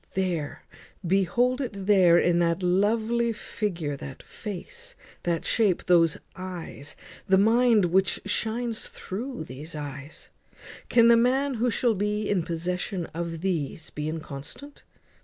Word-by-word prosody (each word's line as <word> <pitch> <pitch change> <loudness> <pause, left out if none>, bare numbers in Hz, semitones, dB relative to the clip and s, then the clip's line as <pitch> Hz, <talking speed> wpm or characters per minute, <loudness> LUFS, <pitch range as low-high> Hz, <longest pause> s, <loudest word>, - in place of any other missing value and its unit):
"There, 175 -6 -2 0.4
behold 235 +9 +2
it 245 -5 -3
there 185 -4 +6
in 175 0 +3
that 170 +1 +1
lovely 220 +6 +2
figure, 185 -8 -3
in 140 - -4
that 135 -1 -9
face, 480 - -8 0.3
that 170 -2 -1
shape, 205 -6 +2
those 165 -3 +4 0.2
eyes, 180 -6 -7 0.3
that 190 - +6
mind 225 0 +4
which 190 +2 +2
shines 225 +2 -2
through 245 +7 -6
these 150 +6 -8
eyes; 145 0 -8 0.6
can 235 -1 +6
the 235 - +7
man 265 +4 +2
who 245 +1 +1
shall 235 0 +2
be 210 +1 -1
in 200 -3 +1
possession 175 +2 -3
of 165 0 -4
these 160 -4 -2
be 150 +1 -3
inconstant? 160 - -8
190 Hz, 135 wpm, -26 LUFS, 165-230 Hz, 0.6 s, the